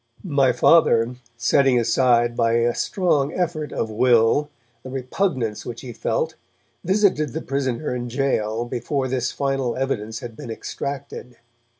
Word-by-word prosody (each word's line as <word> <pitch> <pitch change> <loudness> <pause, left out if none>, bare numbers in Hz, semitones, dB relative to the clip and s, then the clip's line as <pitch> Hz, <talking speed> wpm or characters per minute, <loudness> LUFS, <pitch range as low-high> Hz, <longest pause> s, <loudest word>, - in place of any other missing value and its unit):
My 140 -8 +3
Father, 120 -3 +4 0.2
setting 125 +1 +3
aside 120 0 +2
by 115 -1 +2
a 120 +1 +2
strong 150 -7 0
effort 160 -4 -2
of 110 - -2
will 120 +5 +3 0.3
the 130 - -9
repugnance 130 - -2
which 120 -1 -7
he 125 -3 -8
felt, - - -1 0.5
visited 185 - +2
the - - -3
prisoner 135 0 -2
in 125 -1 -3
gaol 120 -3 -1
before 130 +3 -2
this 130 -1 -1
final 135 -3 -1
evidence 110 -4 -3
had 120 -2 -8
been 115 - -9
extracted. 125 +1 -6
125 Hz, 135 wpm, -22 LUFS, 120-140 Hz, 0.5 s, Father